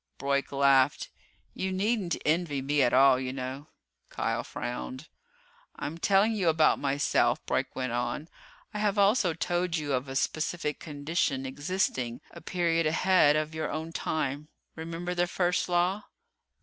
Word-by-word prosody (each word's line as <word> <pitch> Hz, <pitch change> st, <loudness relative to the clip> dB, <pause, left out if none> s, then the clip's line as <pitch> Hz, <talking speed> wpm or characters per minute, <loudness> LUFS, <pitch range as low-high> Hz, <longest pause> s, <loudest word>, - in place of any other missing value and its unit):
Broyk 140 Hz, 0 st, -1 dB
laughed. 140 Hz, -1 st, +3 dB, 0.4 s
"You 190 Hz, 0 st, -3 dB
needn't 195 Hz, -2 st, 0 dB
envy 155 Hz, -2 st, +1 dB
me 145 Hz, +1 st, +1 dB
at 120 Hz, -2 st, +3 dB
all, 130 Hz, 0 st, +6 dB
you 130 Hz, -1 st, -3 dB
know." 135 Hz, +2 st, -6 dB, 0.4 s
Kial -, -, -2 dB
frowned. 130 Hz, +4 st, -6 dB, 0.7 s
"I'm 160 Hz, +3 st, -5 dB
telling 200 Hz, +4 st, +3 dB
you 195 Hz, -6 st, +1 dB
about 155 Hz, -1 st, +3 dB
myself," 140 Hz, +1 st, +1 dB
Broyk -, -, 0 dB
went 130 Hz, -2 st, -2 dB
on, 120 Hz, +5 st, -2 dB, 0.5 s
"I 210 Hz, -, -3 dB
have 210 Hz, -1 st, +1 dB
also 200 Hz, -4 st, +3 dB
told 175 Hz, 0 st, -1 dB
you 145 Hz, -2 st, -2 dB
of 130 Hz, +1 st, -1 dB
a 135 Hz, -, -6 dB
specific 155 Hz, +2 st, -1 dB
condition 145 Hz, -2 st, -2 dB
existing 130 Hz, -4 st, -2 dB
a -, -, -11 dB
period 165 Hz, -2 st, 0 dB
ahead 160 Hz, -2 st, +4 dB
of 155 Hz, +1 st, -1 dB
your 160 Hz, 0 st, -3 dB
own 160 Hz, +1 st, -4 dB
time. 150 Hz, -2 st, -2 dB, 0.3 s
Remember 170 Hz, +2 st, -4 dB
the 175 Hz, 0 st, +1 dB
First 180 Hz, 0 st, 0 dB
Law?" 180 Hz, +4 st, +1 dB
155 Hz, 150 wpm, -28 LUFS, 140-175 Hz, 0.7 s, all